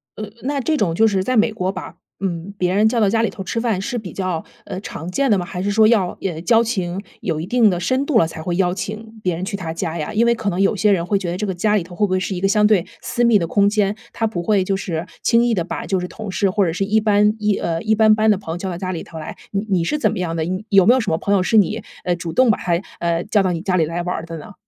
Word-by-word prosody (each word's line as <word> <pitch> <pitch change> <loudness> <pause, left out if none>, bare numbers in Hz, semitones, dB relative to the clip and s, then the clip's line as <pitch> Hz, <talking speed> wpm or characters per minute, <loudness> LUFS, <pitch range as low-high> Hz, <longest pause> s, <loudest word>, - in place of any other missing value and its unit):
呃 215 - -5 0.2
那 280 +2 -1
这 305 +4 0
种 175 - 0
就 225 +5 +4
是 195 -3 +1
在 255 +4 0
美 220 +1 +4
国 185 -3 -1
把 - - -8 0.2
嗯， 185 -1 -3
别 180 -1 0
人 210 +3 +4
叫 235 0 0
到 210 - +4
家 225 - +2
里 230 - +1
头 195 - -7
吃 230 +4 -2
饭， 225 -5 0
是 195 +5 -4
比 195 -5 -8
较， 185 -4 -3 0.2
呃， - - -5
常 175 -4 -7
见 275 +7 +1
的 210 - +4
吗？ 180 - -2
还 180 0 -5
是 200 - -1
说 215 +2 +4
要， 205 -6 +2
呃， 170 -4 -3
交 230 +5 +4
情 190 -6 -2 0.2
有 160 -4 -2
一 160 - -4
定 230 +2 +4
的 180 -2 -1
深 260 +10 0
度 290 - +3
了， 190 - +5
才 160 0 -8
会 175 +2 -2
邀 180 -1 +1
请 220 +3 -6
别 180 -4 0
人 175 +3 -4
去 200 - -4
他 175 -5 -4
家 165 0 -3
呀？ 150 - -3
因 225 +2 +2
为 235 - +4
可 220 -3 -2
能 180 -1 -2
有 195 +2 +3
些 210 +1 +3
人 175 -4 +1
会 200 +2 +1
觉 185 -3 -4
得 175 - -3
这 210 - -2
个 190 - -2
家 210 +4 +1
里 200 - +1
头 175 +1 -12
会 205 +3 +2
不 - - -10
会 185 0 +1
是 185 - -3
一 180 - -4
个 195 - +3
相 210 +1 +3
对 210 -5 +4 0.2
私 240 - -1
密 235 -2 +5
的 175 - -1
空 200 +4 +3
间， 205 -1 +1 0.2
他 225 - -1
不 215 -6 -2
会 200 +1 +2
就 195 +1 0
是 170 -3 -3 0.2
轻 235 0 +3
易 240 - +2
地 180 -6 0
把 170 - -5
就 190 -1 0
是 180 - -4
同 215 +1 -7
事 195 +1 +1
或 200 +1 +2
者 165 - -1
是 190 - -1
一 215 +2 +3
般 210 0 +3
一 210 -1 +1
呃 165 -1 -1
一 220 - +2
般 215 0 +5
般 215 0 +3
的 - - +4
朋 165 - -7
友 - - -4
叫 190 - -5
到 180 - -3
家 185 -1 -3
里 170 - -4
头 160 - -9
来。 155 - -7
你 200 +2 -2
你 185 -4 +2
是 300 - -1
怎 - - +2
么 220 - -4
样 175 -2 -2
的？ 160 - -1
你 185 +5 -3
有 195 -2 +5
没 245 - +7
有 - - +2
什 220 -8 -1
么 160 - 0
朋 200 - +1
友 185 - +2
是 225 - 0
你， 210 +2 +2 0.2
呃， 175 - 0
主 170 -1 -6
动 255 +6 +4
把 215 - +3
他， 175 - -1 0.3
呃， 170 0 0
叫 205 -1 +2
到 185 - +1
你 170 -2 -3
家 185 0 0
里 165 -3 +3
来 165 +3 -3
玩 180 +1 -2
儿 165 - -5
的 165 -1 -7
呢？ 205 - -11
195 Hz, 355 characters per minute, -20 LUFS, 175-215 Hz, 0.3 s, 没